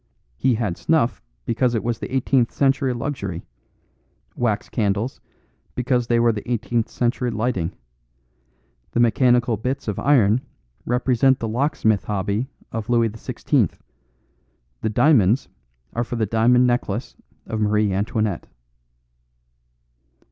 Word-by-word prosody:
He 125 - +2
had 105 -6 -2
snuff 155 -7 +1 0.2
because 120 +1 +1
it 110 - -1
was 120 -1 -2
the - - -6
eighteenth 130 -2 +2
century 135 +2 +2
luxury; 120 - -4 0.9
wax 110 -4 -1
candles, 105 +3 -1 0.5
because 125 -1 0
they 120 0 +3
were 115 0 +4
the 110 +2 -5
eighteenth 120 -1 0
century 125 +1 -1
lighting; 110 -6 -1 1.2
the - - +1
mechanical 120 0 +3
bits 125 +5 -3
of 105 - -2
iron 125 -5 +4 0.5
represent 125 +1 +3
the 115 - -3
locksmith 110 -3 +1
hobby 105 +5 -1 0.2
of 115 -3 -5
Louis 115 -2 +3
XVI; 110 +1 0 1.1
the 110 - 0
diamonds 115 -1 +3 0.4
are 120 - 0
for 120 - -5
the 115 -2 +1
Diamond 115 +4 +4
Necklace 120 -2 -1 0.3
of 110 -1 -3
Marie 105 -1 +2
Antoinette." 105 -1 -1
115 Hz, 120 wpm, -22 LUFS, 110-125 Hz, 1.2 s, were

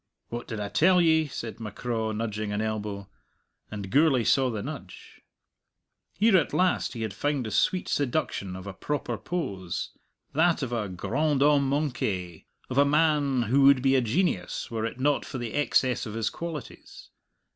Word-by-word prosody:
"What 120 0 -5
did 110 - -5
I 105 - -2
tell 180 - +4
ye?" 160 -2 +4
said 120 -5 -6
M'Craw, 110 +1 -3
nudging 110 -1 -3
an 105 - -1
elbow; 105 -2 -3 0.6
and 100 -2 -6
Gourlay 140 -3 +4
saw 130 +2 +3
the 110 -4 -4
nudge. - - -9 1.0
Here 215 0 +4
at 165 - 0
last 185 0 +1
he 115 -3 -4
had 110 -3 -3
found 145 +3 -1
the 110 - -4
sweet 180 - +1
seduction 125 -9 -1
of 95 0 -8
a 100 - -6
proper 145 +9 -3
pose 95 - -4 0.4
that 160 0 +2
of 120 -2 -3
a 110 -4 -2
grand 140 - 0
homme 145 -2 +4
manqué, 105 - -2 0.2
of 130 +1 0
a - - +7
man 145 -3 +2
who 130 +6 +2
would 135 -2 +6
be 135 -1 +4
a 130 - +4
genius 120 - -1
were 115 -1 -1
it 120 - -8
not 145 +1 +2
for - - -6
the 120 -3 -5
excess 130 -4 +1
of 110 - -6
his 115 -1 -1
qualities. 165 -6 -8
125 Hz, 175 wpm, -27 LUFS, 110-145 Hz, 1.0 s, a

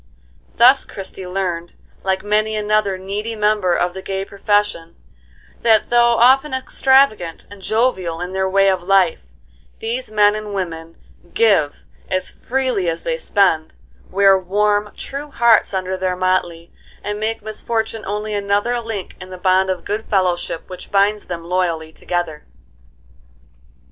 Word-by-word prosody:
Thus 255 +3 +6
Christie 190 -1 -8
learned, 180 -2 -3 0.3
like 190 0 -1
many 215 +1 +1
another 210 -2 +1
needy 205 +4 -4
member 210 -4 +1
of 175 0 0
the 190 - -7
gay 195 0 -4
profession, 200 -4 -1 0.7
that 225 -1 +3
though 235 0 +4
often 265 +4 +4
extravagant 260 -9 +2
and 205 -1 -12
jovial 190 -7 0
in 180 +1 -5
their 190 0 0
way 195 +1 +3
of 190 -2 +2
life, 185 -2 +3 0.6
these 240 +2 -4
men 210 -1 +4
and 210 -1 -5
women 165 -3 -5 0.4
give 200 -11 +2 0.2
as 185 0 -1
freely 250 -8 -1
as 165 - -4
they - - -2
spend, 190 - +1 0.4
wear 195 0 +5
warm, 205 +2 0
true 285 +2 -6
hearts 235 -4 +3
under 190 -1 -2
their 185 -1 -1
motley, 180 -2 -1 0.3
and 210 0 -4
make 220 0 -2
misfortune 220 +1 -3
only 210 +1 -3
another 205 +4 0
link 225 -5 -6
in 185 - -9
the 185 - -8
bond 185 +1 +2
of 185 -2 -3
good 215 +2 -3
fellowship 180 -4 -1
which 185 - -10
binds 205 +1 +2
them 170 -2 -6
loyally 170 -3 -2
together. 175 -4 -3
200 Hz, 145 wpm, -19 LUFS, 185-215 Hz, 0.7 s, Thus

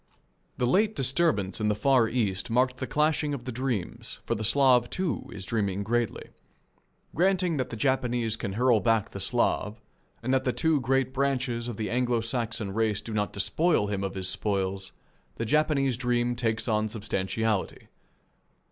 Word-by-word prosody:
The 125 - +1
late 205 - +2
disturbance 130 - +1
in 105 - +1
the 105 - +2
Far 125 0 +3
East 100 -6 -1
marked 125 +2 +2
the 130 - -4
clashing 150 +1 +1
of 125 -3 -9
the 130 - -3
dreams, 120 -6 -3
for - - 0
the 110 -1 -3
Slav, 125 0 +4
too, 180 - -2
is 95 -2 -6
dreaming 100 -2 -1
greatly. 120 +2 -1 0.8
Granting 180 -1 +2
that 130 - -2
the - - -5
Japanese 120 -3 0
can 100 -3 -4
hurl 120 +1 +3
back 110 +1 +1
the - - -6
Slav 105 +2 0 0.4
and 130 +3 0
that 130 0 +2
the 125 - 0
two 160 -3 +2
great 130 +1 +1
branches 130 -3 -1
of 120 -4 -5
the 110 - -3
Anglo 120 -1 +1
Saxon 115 -3 -3
race 110 -2 +1
do 110 +1 -7
not 105 -1 -1
despoil 155 - +1
him 100 -1 -2
of 95 0 -3
his 95 -1 -2
spoils, 95 -1 -1 0.4
the 115 - -3
Japanese 140 -2 +2
dream 120 -1 0
takes 115 -1 -1
on 110 -1 +1
substantiality. 105 -1 -2
120 Hz, 170 wpm, -27 LUFS, 105-130 Hz, 0.8 s, Slav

